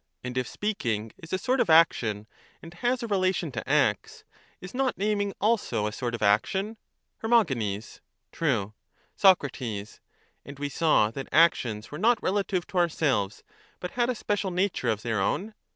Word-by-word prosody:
And 125 0 -5
if 130 -1 -1
speaking 120 - -2
is 165 - -12
a 185 - +1
sort 255 +7 0
of 185 - +2
action 115 -10 +4 0.3
and 165 0 -12
has 245 +6 -1
a - - -3
relation 185 -5 0
to 120 - -6
acts, - - +1 0.4
is 180 - -10
not 260 0 0
naming 205 0 0
also 210 - +1
a 105 - -1
sort 120 +2 -3
of 115 - -5
action? 190 - +1 0.4
Her. 230 0 +4 0.9
True. 115 -10 -1 0.4
Soc. 190 -6 +5 0.2
And 110 +5 -9
we 145 0 -3
saw 140 -8 +3
that 135 +3 -7
actions 120 -10 +2
were 150 - -6
not 230 +3 +3
relative 190 -2 0
to 185 - -2
our 175 -1 +3
selves, 110 -11 -1 0.4
but 180 - -5
had 240 0 0
a 250 - 0
special 205 -2 -1
natiu"e 180 -8 0
of 110 -1 -4
their 110 -4 -1
own? 205 - -1
170 Hz, 170 wpm, -27 LUFS, -, 0.9 s, Soc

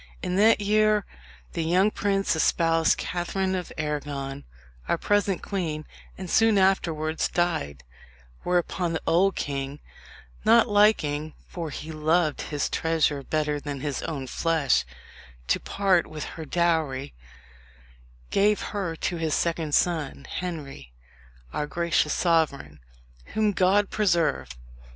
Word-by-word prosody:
In 180 -1 -1
that 220 +2 +5
year 215 0 +3 0.5
the 165 - -1
young 185 +6 +3
prince 195 -3 0
espoused 165 +1 +2
Catherine 185 +2 -2
of 180 -2 -4
Arragon, 145 -2 -4 0.4
our - - +1
present 205 -2 0
queen, 160 -6 -3 0.3
and 185 - -6
soon 225 +3 +4
afterwards 165 -5 +1
died; 160 - -1 0.6
whereupon 175 -1 0
the 160 - -2
old 190 +4 +3
king, 140 0 -4 0.6
not 230 +1 +5
liking 155 -8 +2
for 170 -3 -5
he 155 +2 -7
loved 155 0 +1
his 145 -2 -2
treasure 160 -3 0
better 150 +1 -1
than 145 -2 -6
his 145 -2 -3
own 140 -4 -4
flesh 155 0 +1 0.6
to - - +1
part 190 -4 +1
with 155 -1 -6
her 160 - -7
dowry, 160 -5 0 1.2
gave 205 +1 +3
her 190 -5 -2
to 175 +2 -2
his 160 -2 0
second 165 -3 0
son, 165 -5 0
Henry, 145 - -6 0.6
our 150 - -2
gracious 170 -1 +1
sovereign, 150 - 0 0.6
whom 215 -1 +3
God 195 +1 +2
preserve! 175 -6 +1
165 Hz, 125 wpm, -26 LUFS, 150-190 Hz, 1.2 s, that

